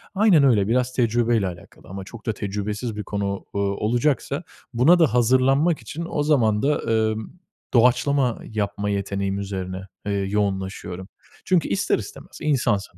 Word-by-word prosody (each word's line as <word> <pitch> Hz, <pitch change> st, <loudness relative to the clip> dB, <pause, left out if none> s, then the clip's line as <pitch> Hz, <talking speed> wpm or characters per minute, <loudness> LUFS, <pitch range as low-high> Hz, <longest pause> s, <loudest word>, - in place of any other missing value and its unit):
Aynen 190 Hz, -7 st, +5 dB
öyle, 110 Hz, -8 st, +4 dB
biraz 125 Hz, +2 st, +1 dB
tecrübeyle 115 Hz, -3 st, +1 dB
alakalı. 85 Hz, -1 st, -11 dB
Ama 95 Hz, +1 st, -7 dB
çok 110 Hz, +4 st, -12 dB
da 110 Hz, -, 0 dB
tecrübesiz 105 Hz, +3 st, -4 dB
bir 105 Hz, -, -4 dB
konu, 100 Hz, -1 st, -3 dB
ııı, 100 Hz, -, +1 dB
olacaksa, 125 Hz, -, 0 dB, 0.3 s
buna 135 Hz, +10 st, +5 dB
da 160 Hz, -6 st, +3 dB
hazırlanmak 130 Hz, +7 st, +3 dB
için 165 Hz, +3 st, -6 dB
o 145 Hz, -, -1 dB
zaman 115 Hz, -8 st, +2 dB
da, 145 Hz, +2 st, +1 dB
ımm, 110 Hz, +6 st, -1 dB, 0.3 s
doğaçlama 125 Hz, +1 st, +3 dB
yapma 105 Hz, -1 st, -3 dB
yeteneğim 100 Hz, 0 st, -2 dB
üzerine, 95 Hz, -2 st, -4 dB, 0.2 s
eee, 100 Hz, -, -1 dB
yoğunlaşıyorum. 95 Hz, -2 st, -2 dB, 0.4 s
Çünkü 180 Hz, -3 st, +2 dB
ister 100 Hz, -, +1 dB
istemez -, -, -10 dB
insansın, 110 Hz, -, 0 dB
110 Hz, 145 wpm, -23 LUFS, 100-130 Hz, 0.4 s, Aynen